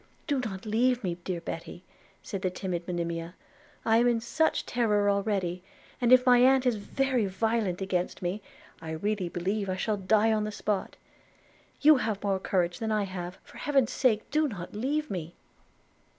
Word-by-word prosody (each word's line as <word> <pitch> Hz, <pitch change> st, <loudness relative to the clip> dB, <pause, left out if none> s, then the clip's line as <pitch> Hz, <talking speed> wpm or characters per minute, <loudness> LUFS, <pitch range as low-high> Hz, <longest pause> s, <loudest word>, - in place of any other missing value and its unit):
'Do 285 Hz, -3 st, 0 dB
not 200 Hz, -6 st, -5 dB
leave 240 Hz, +3 st, +2 dB
me, 175 Hz, -2 st, -2 dB
dear 180 Hz, -2 st, -3 dB
Betty,' 170 Hz, +1 st, -7 dB, 0.4 s
said 195 Hz, -, -5 dB
the 185 Hz, -, +1 dB
timid 180 Hz, -2 st, -4 dB
Monimia; 170 Hz, -1 st, -3 dB, 0.5 s
'I 225 Hz, 0 st, +4 dB
am 240 Hz, +1 st, +4 dB
in 235 Hz, -1 st, +2 dB
such 315 Hz, +7 st, 0 dB
terror 210 Hz, -4 st, +2 dB
already, 195 Hz, -3 st, -1 dB, 0.4 s
that 245 Hz, -1 st, +2 dB
if 255 Hz, 0 st, +7 dB
my 250 Hz, -1 st, +6 dB
aunt 260 Hz, +1 st, +5 dB
is 245 Hz, -3 st, +2 dB
very 255 Hz, +1 st, 0 dB
violent 195 Hz, -1 st, -1 dB
against 180 Hz, -2 st, -2 dB
me, 185 Hz, +4 st, -3 dB, 0.4 s
I 160 Hz, -1 st, -5 dB
really 195 Hz, +2 st, -1 dB
believe 195 Hz, +4 st, -2 dB
I 185 Hz, -, 0 dB
shall 210 Hz, +3 st, -1 dB
die 215 Hz, +3 st, +3 dB
on 215 Hz, -1 st, +1 dB
the 215 Hz, -, -3 dB
spot. 205 Hz, -1 st, -2 dB, 0.9 s
You 305 Hz, 0 st, +7 dB
have 215 Hz, -4 st, -2 dB
more 195 Hz, -2 st, +1 dB
courage 175 Hz, -2 st, 0 dB
than 220 Hz, -1 st, -2 dB
I 215 Hz, -1 st, +1 dB
have 185 Hz, -2 st, -6 dB
– -, -, -36 dB
for -, -, -15 dB
Heaven's 275 Hz, -5 st, +1 dB
sake, 225 Hz, -5 st, +1 dB
do 305 Hz, +1 st, +2 dB
not 180 Hz, -8 st, -7 dB
leave 290 Hz, +8 st, -1 dB
me.' 175 Hz, -3 st, -5 dB
205 Hz, 180 wpm, -28 LUFS, 185-240 Hz, 0.9 s, if